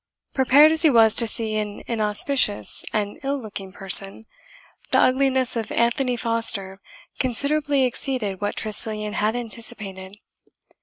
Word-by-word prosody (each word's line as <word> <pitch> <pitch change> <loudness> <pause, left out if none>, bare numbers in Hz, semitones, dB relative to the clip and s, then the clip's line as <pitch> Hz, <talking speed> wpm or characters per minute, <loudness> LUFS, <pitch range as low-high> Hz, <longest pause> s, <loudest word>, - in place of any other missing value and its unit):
Prepared 280 +4 +5
as 320 0 +1
he 320 - +5
was 225 -4 +5
to 235 - +4
see 220 -1 -2
an 210 -1 -5
inauspicious 215 - +1
and 205 -1 -3
ill 280 0 -3
looking 200 -5 -8
person, 195 +2 +3 0.6
the - - +2
ugliness 260 -1 +1
of 225 -2 -4
Anthony 245 +2 0
Foster 225 -5 -3 0.4
considerably 280 +2 0
exceeded 240 -6 -4
what 205 - -3
Tressilian 215 -1 -2
had 215 +2 -1
anticipated. 215 -5 -6
225 Hz, 125 wpm, -22 LUFS, 210-260 Hz, 0.6 s, Prepared